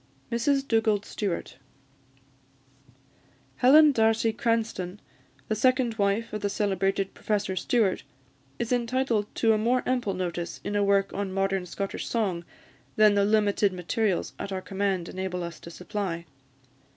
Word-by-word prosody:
MRS 270 +4 +1
DUGALD 220 -3 +2
STEWART. 180 - -4 2.0
Helen 295 +4 +7
D'Arcy 225 -2 +2
Cranstoun, 225 -6 -1 0.5
the - - 0
second 250 +2 +2
wife 200 +3 0
of 215 - -3
the 205 - 0
celebrated 195 -1 0
Professor 205 -3 -2
Stewart, 205 0 +1 0.6
is 235 0 -3
entitled 240 -3 0
to 225 -1 +3
a 215 - +1
more 245 +3 +1
ample 245 -7 0
notice 175 -2 -4
in 205 - -3
a 205 - +2
work 200 0 +2
on 200 -1 -3
Modern 195 -1 -1
Scottish 195 +3 -4
Song 195 -7 -1 0.5
than 215 -1 +6
the 200 0 +3
limited 205 -1 +2
materials 185 +2 -1
at 200 - -5
our 190 - -2
command 195 -3 -1
enable 185 -1 -4
us 170 -1 -7
to - - -10
supply. 180 -1 -4
205 Hz, 140 wpm, -27 LUFS, 190-230 Hz, 2.0 s, Helen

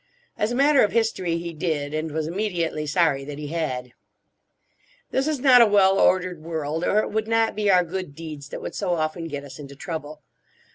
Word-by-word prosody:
As 210 +2 -1
a - - -1
matter 280 +1 +5
of 210 - 0
history 220 -7 0
he 170 0 -5
did, 150 -3 -2
and 155 0 -2
was 155 +1 -2
immediately 170 -4 -2
sorry 150 -3 +2
that 145 +1 -7
he 150 -1 -6
had. 130 -7 -3 1.2
This 270 +2 0
is 305 -3 -1
not 250 -2 +7
a 230 - +7
well 195 -1 +4
ordered 180 -3 +2
world, 160 0 -3
or 210 +3 +3
it - - -5
would 220 0 -1
not 225 0 +1
be 210 -1 0
our 180 -2 +5
good 180 -3 -6
deeds 155 -3 -8
that - - -7
would - - -5
so 180 -4 -1
often 160 +1 -2
get 145 -2 -5
us 135 -1 -11
into 140 -1 -10
trouble. 155 -2 -7
170 Hz, 205 wpm, -24 LUFS, 150-205 Hz, 1.2 s, not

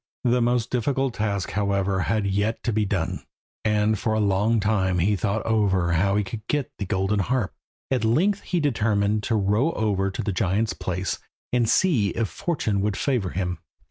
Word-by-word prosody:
The 125 0 +3
most 120 0 +1
difficult 130 +1 0
task, 100 -4 -2
however, 100 -2 0
had 105 +2 0
yet 100 +3 0
to 115 - 0
be 105 0 +1
done, 95 -4 -2 0.4
and 105 0 +2
for 110 - 0
a 110 - +1
long 105 +3 +2
time 100 -3 +1
he 100 +5 +2
thought 100 +4 -1
over 95 -6 +2
how 100 +4 +2
he 105 - +2
could 105 +3 -6
get 145 -3 -1
the 100 - -3
golden 95 +1 0
harp. 115 +1 0 0.4
At 130 -3 +1
length 180 - +2
he 180 - -1
determined 110 -7 +1
to 115 - -1
row 105 +10 +2
over 100 -3 0
to 95 - -4
the 105 - -1
giant's 100 +2 0
place 90 +1 -3 0.3
and 120 -3 +2
see 140 - +3
if 115 0 -2
fortune 150 - -1
would 105 0 -1
favour 125 -9 0
him. 90 0 -3
105 Hz, 185 wpm, -24 LUFS, 95-115 Hz, 0.4 s, The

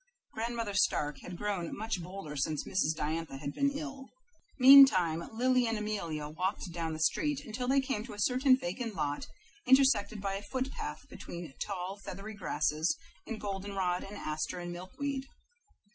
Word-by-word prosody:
Grandmother 230 -2 -2
Stark 150 -6 +1
had 180 -1 -8
grown 195 -4 -2
much 215 -3 -2
bolder 175 -4 -7
since 150 +2 -1
Mrs. 160 -5 +1
Diantha 155 -2 -2
had 140 +1 -5
been 280 - +2
ill. 280 -2 -6 0.5
Meantime 250 - +8
Lily 250 +2 +2
and 225 0 0
Amelia 170 -8 -3
walked 180 +4 -3
down 165 -1 -3
the 155 - -5
street 290 - +1
until 245 +3 -4
they 275 +2 +4
came 265 -5 -2
to 245 - -8
a 205 - -9
certain 255 +3 +4
vacant 215 +2 -4
lot 145 -3 -2 0.4
intersected 260 -5 +4
by 195 0 -2
a - - -7
foot 260 +4 -3
path - - -6
between 170 -5 -8
tall, 195 0 -4
feathery 200 +4 -7
grasses 155 -4 0 0.3
and 225 -2 -4
goldenrod 195 -2 -2
and 205 +1 -8
asters 155 +3 -3
and 175 - -5
milkweed. 270 +10 -4
200 Hz, 160 wpm, -32 LUFS, 170-250 Hz, 0.5 s, Meantime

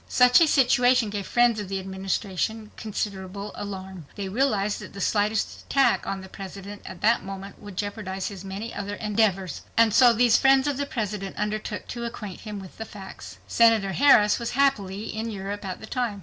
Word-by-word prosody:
Such 250 +4 +6
a 330 - +6
situation 245 -5 +4
gave 200 -2 -4
friends 240 -2 +3
of 205 -3 -5
the 195 0 -2
Administration 195 +3 -3
considerable 200 -1 -5
alarm. 190 -5 -7
They 195 -2 -4
realized 210 -3 +1
that - - -10
the 200 - -8
slightest 210 +2 0
attack 275 -1 +2
on 195 -1 -3
the 190 - -10
President 195 +1 -9
at - - -9
that 230 +3 +3
moment 195 +1 -8
would 205 -3 -10
jeopardize 205 -2 -3
his 195 -3 -9
many 195 +4 -6
other 205 0 -4
endeavors. 205 -4 0 0.2
And 225 -2 +5
so 245 0 +7
these 235 0 +4
friends 270 0 +5
of 285 -3 0
the 285 0 -2
President 210 -6 -4
undertook 210 0 -3
to 240 -1 -5
acquaint 210 -5 -6
him 210 -2 -6
with 190 +1 -12
the - - -2
facts. 190 - -10
Senator 225 - +4
Harris 210 -2 +5
was 235 - -3
happily 215 -8 0
in 225 +1 -3
Europe 200 0 -5
at 185 -2 -5
the - - -9
time. 230 -3 -2
205 Hz, 190 wpm, -25 LUFS, 195-230 Hz, 0.2 s, so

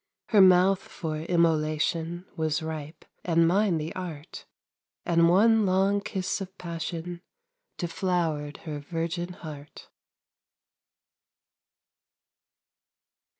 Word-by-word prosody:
Her 210 -3 +6
mouth 185 +1 +6
for 165 -8 -5
immolation 165 +1 0
Was 160 -1 -1
ripe, 155 0 -6 0.2
and 165 -1 +3
mine 190 0 +2
the 155 +1 -4
art; 170 -3 -8 0.6
And 170 -1 +4
one 220 +5 +5
long 195 +2 +2
kiss 190 0 -3
of 190 0 -8
passion 170 0 -5 0.6
Deflowered 165 -4 -1
her 150 -2 -4
virgin 170 +4 -3
heart. 150 -4 -10
170 Hz, 90 wpm, -27 LUFS, 160-185 Hz, 0.6 s, Her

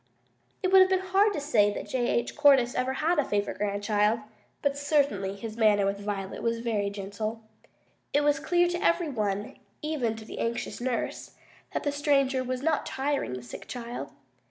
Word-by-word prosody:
It 370 - +1
would 380 -1 +7
be 380 - +3
hard 385 +3 +2
to 300 - -2
say 225 -8 +3
that - - -5
J. 245 -2 0
H. 235 - 0
Cordyce 270 -4 +5
ever 255 +1 0
had 315 +4 +1
a - - +4
favorite 205 -4 -2
grandchild, 210 +2 +1 0.4
but 285 -1 +1
certainly 280 -10 +1
his 220 +2 -7
manner 210 -3 +4
with 200 0 -1
Violet 200 -2 -4
was 230 0 0
very 215 -4 0
gentle. 210 +3 -5 0.7
It 290 - +3
was 290 -1 +3
clear 350 +4 +2
to 350 0 -2
every 335 -1 +2
one, 205 -5 -2 0.2
even 275 -8 -1
to 220 0 -10
the - - -8
anxious 235 +1 -3
nurse, 245 -1 -3 0.4
that - - -2
the 290 - 0
stranger 275 -2 +2
was 255 +1 -3
not 315 -1 +1
tiring 275 - -1
the 125 -1 -6
sick 120 - -9
child. 240 -1 -6
245 Hz, 180 wpm, -28 LUFS, 210-290 Hz, 0.7 s, would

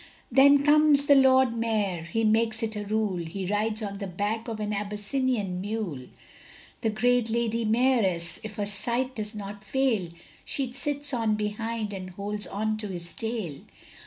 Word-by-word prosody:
Then 280 +2 +6
comes 295 -1 +5
the 285 - +6
Lord 260 -3 +5
Mayor 215 -6 0
he 225 +7 -1
makes 225 +1 +2
it 220 -1 -2
a 210 0 -4
rule, 210 -2 0
He 185 +4 -5
rides 215 +3 -1
on 200 -1 -5
the 200 - -4
back 205 +5 -2
of 225 -2 -4
an 210 0 -2
Abyssinian 210 -1 -1
mule; 195 - -4 0.7
The 225 - +1
great 240 +2 +2
Lady 230 0 0
Mayoress, 215 -8 +2
if 215 -1 -7
her 205 -2 -2
sight 235 +6 0
does 215 -2 -5
not 205 -1 -7
fail, 230 -7 0 0.3
She 265 -3 -2
sits 290 +1 -2
on 225 -3 +1
behind, 215 +1 -3
and 185 -1 -6
holds 205 +3 -4
on 215 +2 -2
to 215 -1 -4
his 170 -3 -4
tail. 220 -10 -4
215 Hz, 165 wpm, -27 LUFS, 200-240 Hz, 0.7 s, Then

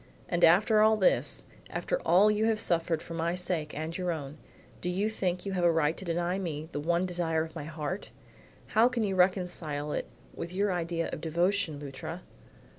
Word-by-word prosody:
"And 175 -1 0
after 210 +6 +6
all 220 0 +5
this, 190 - +1 0.2
after - - -2
all 200 +4 +5
you 210 +1 +1
have 225 -1 +2
suffered 165 -3 +1
for 165 - -8
my 165 +1 -1
sake 175 -5 -3
and 160 +2 -4
your 180 -2 -1
own, 150 -2 -6 0.4
do 180 - -2
you 200 +4 0
think 180 -3 -2
you 200 - -2
have 180 -2 -1
a 170 - +6
right 160 -1 +2
to - - -9
deny 175 +1 -1
me 160 -4 -4
the 145 - -3
one 170 +4 +1
desire 170 -3 0
of 160 0 -9
my 155 -3 -5
heart? 160 +4 -4 0.6
How 230 +3 +5
can 245 -3 -1
you 200 -2 0
reconcile 180 -5 0
it - - -2 0.3
with 170 +1 -6
your 200 +1 +1
ideas 170 -1 -2
of - - -5
devotion, 170 -1 0
Luttra?" 140 -2 -7
175 Hz, 195 wpm, -29 LUFS, 160-190 Hz, 0.6 s, after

